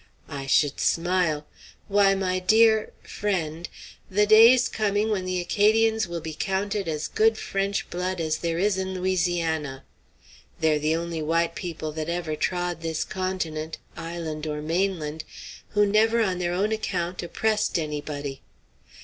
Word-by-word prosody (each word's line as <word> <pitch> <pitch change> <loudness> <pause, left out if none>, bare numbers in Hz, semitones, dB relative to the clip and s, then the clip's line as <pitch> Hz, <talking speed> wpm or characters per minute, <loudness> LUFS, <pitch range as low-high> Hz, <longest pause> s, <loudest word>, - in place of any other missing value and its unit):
I 135 -1 -6
should 145 +1 +2
smile! 170 -3 +1 0.4
Why, 200 -1 +4
my 185 -1 0
dear 220 +3 +4
friend, 175 -5 -3 0.4
the 205 +2 +3
day's 225 +4 +7
coming 215 0 0
when 190 -3 -1
the 185 0 -1
Acadians 220 +4 +2
will 170 -1 -5
be 160 0 -6
counted 195 +3 -2
as 155 -1 -2
good 220 0 +2
French 195 -1 -2
blood 180 +1 -2
as 155 -1 0
there 165 0 -2
is 195 +1 +1
in 190 0 -3
Louisiana! 170 -6 -1 0.8
They're 155 -1 +2
the 155 +2 +1
only 165 -1 -3
white 165 +2 +1
people 165 -3 -5
that 155 +1 -4
ever 170 -3 -2
trod 175 0 -2
this 160 -1 -2
continent 165 -4 -3 0.2
island 165 -2 -5
or 150 -1 -3
mainland 160 -1 -1 0.5
who 205 - +6
never 220 +3 +3
on 185 -3 -1
their 175 -1 -1
own 195 +5 0
account 180 -5 -2
oppressed 215 +4 0
anybody. 145 -3 -4
175 Hz, 145 wpm, -25 LUFS, 160-200 Hz, 0.8 s, day's